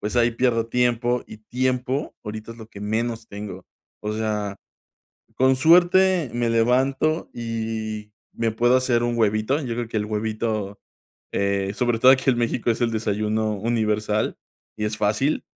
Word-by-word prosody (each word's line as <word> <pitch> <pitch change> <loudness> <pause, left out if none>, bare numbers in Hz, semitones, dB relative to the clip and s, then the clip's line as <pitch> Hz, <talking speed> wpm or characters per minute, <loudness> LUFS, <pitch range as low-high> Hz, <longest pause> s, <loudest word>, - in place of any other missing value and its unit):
pues, 105 +3 -3
ahí 120 0 +4
pierdo 115 -1 +1
tiempo, 120 0 +1
y 110 - -11
tiempo 130 +4 -2
ahorita 110 +1 -6
es 115 - -16
lo 110 -1 -11
que 100 - -11
menos 115 +2 -2
tengo, 100 0 -8 0.4
o 105 0 -2
sea, 105 -2 -2 0.8
con 130 0 +4
suerte 175 +1 +4
me 120 -1 0
levanto 130 +7 +1
y 110 -2 -4 0.2
me 115 -1 -1
puedo 120 +3 +3
hacer 125 -2 +2
un 120 0 0
huevito, 110 +4 +1
yo 125 -6 -3
creo 120 0 -3
que 115 - -4
el 105 - -1
huevito, 110 -1 -2 0.5
eh, 100 0 0
sobre 120 0 0
todo 130 - +8
aquí 130 0 +3
en 120 - 0
México, 120 0 0
es 115 - -1
el 120 -1 +2
desayuno 110 0 -1
universal 105 -1 0 0.4
y 105 - -3
es 105 0 -2
fácil. 105 +9 0
115 Hz, 160 wpm, -23 LUFS, 105-125 Hz, 0.8 s, todo